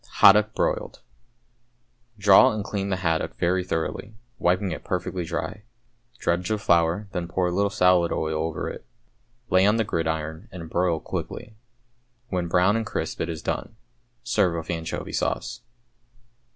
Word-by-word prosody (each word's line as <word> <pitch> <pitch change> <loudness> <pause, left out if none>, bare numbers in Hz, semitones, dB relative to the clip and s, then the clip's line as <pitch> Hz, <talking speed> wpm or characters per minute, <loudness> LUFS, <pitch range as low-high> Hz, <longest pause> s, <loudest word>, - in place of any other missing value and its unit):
=Haddock, 105 +2 +6
Broiled.= - - -1 1.2
Draw 100 +1 +6
and 105 -1 -3
clean 100 -1 -3
the 95 - +1
haddock 80 -1 0
very 90 +2 +1
thoroughly, 90 +5 -3 0.2
wiping 90 +2 +1
it - - -5
perfectly 90 0 -2
dry. 85 - -4 0.6
Dredge 90 +1 -1
with 110 -1 0
flour, 85 +3 +2
then 85 -2 -3
pour 90 +1 0
a 90 - 0
little 100 +3 +1
salad 90 -2 +3
oil 80 0 -1
over 80 -1 -3
it. - - -7 0.7
Lay 95 +1 +5
on 105 +2 +4
the 115 - +2
gridiron 80 +1 -3
and 85 -3 -8
broil 85 -2 +1
quickly. 115 +6 -6 0.7
When 90 -4 -1
brown 90 +4 +3
and 115 - -1
crisp 105 - -4
it 85 - -2
is 80 -2 -5
done. - - -3 0.5
Serve 105 -8 +2
with 80 +1 -4
anchovy 80 -1 -4
sauce. - - -2
90 Hz, 150 wpm, -25 LUFS, 85-100 Hz, 1.2 s, =Haddock